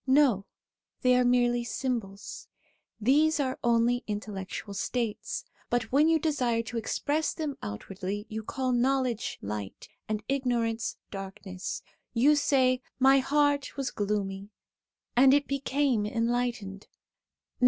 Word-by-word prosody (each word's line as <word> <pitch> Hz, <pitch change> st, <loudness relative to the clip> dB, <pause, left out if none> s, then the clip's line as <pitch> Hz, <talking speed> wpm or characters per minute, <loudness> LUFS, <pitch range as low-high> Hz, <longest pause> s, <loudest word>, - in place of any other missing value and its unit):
No, 260 Hz, -8 st, +4 dB, 0.6 s
they 250 Hz, 0 st, +5 dB
are 250 Hz, -, +4 dB
merely 245 Hz, -1 st, +3 dB
symbols. 230 Hz, -5 st, -4 dB, 0.5 s
These 300 Hz, +8 st, +3 dB
are 260 Hz, -2 st, -1 dB
only 235 Hz, +1 st, +3 dB
intellectual 205 Hz, -1 st, -5 dB
states, 220 Hz, +1 st, -2 dB, 0.2 s
but 240 Hz, -1 st, 0 dB
when 290 Hz, +4 st, +5 dB
you 325 Hz, -, +5 dB
desire 255 Hz, -7 st, 0 dB
to 235 Hz, +1 st, -5 dB
express 300 Hz, +7 st, -1 dB
them 305 Hz, -4 st, -3 dB
outwardly, 190 Hz, -, -5 dB
you 220 Hz, 0 st, -4 dB
call 255 Hz, +4 st, -2 dB
knowledge 250 Hz, -2 st, +1 dB
light, 100 Hz, -1 st, -6 dB, 0.2 s
and 215 Hz, -1 st, -2 dB
ignorance 240 Hz, -4 st, 0 dB
darkness. 195 Hz, -1 st, -6 dB, 0.3 s
You 280 Hz, +6 st, +5 dB
say: 260 Hz, -3 st, +3 dB
' -, -, -52 dB
My 270 Hz, 0 st, +7 dB
heart 285 Hz, 0 st, +1 dB
was 275 Hz, -2 st, -2 dB
gloomy, 200 Hz, -1 st, -2 dB, 0.7 s
and 265 Hz, +2 st, +7 dB
it 285 Hz, 0 st, +2 dB
became 275 Hz, -5 st, +1 dB
enlightened.' 230 Hz, -3 st, -1 dB
240 Hz, 120 wpm, -29 LUFS, 210-270 Hz, 0.7 s, My